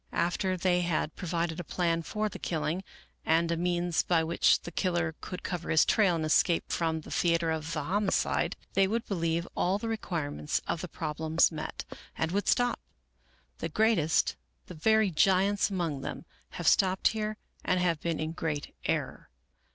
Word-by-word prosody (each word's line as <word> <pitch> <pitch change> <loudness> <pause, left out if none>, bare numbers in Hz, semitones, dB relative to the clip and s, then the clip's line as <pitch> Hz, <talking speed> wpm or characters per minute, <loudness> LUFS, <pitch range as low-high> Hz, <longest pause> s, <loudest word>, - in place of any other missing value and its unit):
After 185 +2 0
they 180 0 +2
had 165 -2 -1
provided 170 -1 -2
a - - -3
plan 170 0 0
for 215 +6 -2
the 210 - -8
killing, 165 +2 -2 0.4
and 165 +1 +2
a - - +2
means 175 0 +1
by 165 -2 +2
which 165 +1 +3
the 175 - -7
killer 175 -2 0
could 180 - -7
cover 180 -2 -4
his 155 - +5
trail 195 -6 +3
and 160 -1 -1
escape 165 +2 +2
from 160 -1 0
the - - -12
theater 170 -1 +2
of 160 0 -3
the 150 -2 -2
homicide, 195 +5 0 0.2
they 195 0 +4
would 230 +3 -1
believe 170 -3 -1
all 185 +2 +1
the 225 - -5
requirements 165 -10 -2
of 165 - -2
the 180 - -4
problems 160 +1 +1
met, 155 -1 -5 0.3
and 160 0 -1
would 200 +2 -1
stop. 245 -1 +2 0.8
The 165 - -3
greatest, 180 -4 +2 0.3
the - - -10
very 215 +5 +3
giants 195 +5 +3
among 170 -8 -2
them, - - -6 0.3
have - - -3
stopped 190 0 +4
here 215 -1 -3 0.3
and 185 - +1
have 170 -3 +1
been 170 -2 -1
in 155 0 -2
great 160 -3 -4
error. - - -2
170 Hz, 175 wpm, -29 LUFS, 160-190 Hz, 0.8 s, his